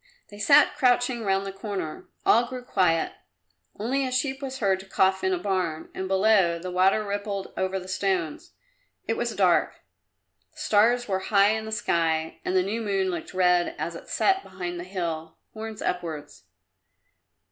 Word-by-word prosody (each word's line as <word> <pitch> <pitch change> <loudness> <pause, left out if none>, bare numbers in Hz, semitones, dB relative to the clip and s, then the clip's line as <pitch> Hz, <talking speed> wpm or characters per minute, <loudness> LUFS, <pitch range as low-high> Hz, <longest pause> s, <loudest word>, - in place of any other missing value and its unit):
They 205 - -12
sat 280 +7 +5
crouching 245 -3 +2
round 195 -1 +1
the 195 - -4
corner. 195 -5 -5 0.2
All 235 +2 +5
grew 250 0 -7
quiet; 180 -8 +1 0.7
only 255 +6 0
a 260 - -2
sheep 265 +2 -1
was 265 -1 -5
heard 195 -5 +1
to 190 - -12
cough 190 0 +2
in 375 - +2
a 370 - +1
barn, 185 - -2
and 190 - -4
below, 190 -3 +3
the 180 +2 -6
water 190 +4 +3
rippled 200 -1 -4
over 190 0 -1
the 185 - -10
stones. 185 -4 -2 0.5
It - - 0
was - - -2
dark; - - +2 0.7
the - - -26
stars 245 -3 +3
were 190 -2 0
high 200 -1 +5
in 220 0 -2
the 220 - -6
sky 165 -6 0
and 185 - -1
the 185 - +4
new 215 +5 -2
moon 195 -3 0
looked 175 +1 -6
red 180 -1 +3
as - - -3
it - - -11
set 385 0 +2
behind 180 - -6
the - - -5
hill, 165 -4 -4 0.2
horns 220 -1 -7
upwards. 160 - -4
195 Hz, 175 wpm, -26 LUFS, 180-220 Hz, 0.7 s, sat